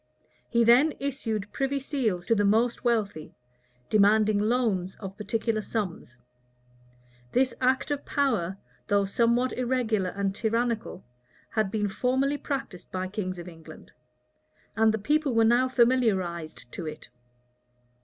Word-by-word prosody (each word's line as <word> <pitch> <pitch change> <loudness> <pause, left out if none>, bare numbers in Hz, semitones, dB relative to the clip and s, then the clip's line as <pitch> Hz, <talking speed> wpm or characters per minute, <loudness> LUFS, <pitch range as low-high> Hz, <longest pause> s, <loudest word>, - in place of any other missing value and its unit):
He 235 0 +3
then 250 +7 +5
issued 225 -7 -3
privy 275 +1 -1
seals 235 -11 -1
to 230 - +3
the 205 -2 +2
most 225 +4 +2
wealthy, 210 -9 -1 0.5
demanding 215 0 +4
loans 210 -5 0
of 195 -2 -8
particular 215 +1 -1
sums: 190 - -4 1.2
this 260 0 +2
act 260 +3 +1
of 285 -1 -2
power, 215 -10 0 0.3
though 200 -1 +2
somewhat 235 +5 +1
irregular 240 -6 0
and 195 0 -2
tyrannical, 230 -1 -1 0.5
had 215 -3 0
been 210 0 -1
formerly 260 +7 0
practised 265 -10 -5
by 185 0 -3
kings 185 -2 -4
of 175 0 -8
England; 160 -2 -13 0.8
and 220 0 +4
the 220 - -1
people 290 +3 +1
were 225 0 +5
now 240 +3 +4
familiarized 195 - +1
to 165 - -6
it. 155 -4 -8
220 Hz, 130 wpm, -27 LUFS, 195-250 Hz, 1.2 s, then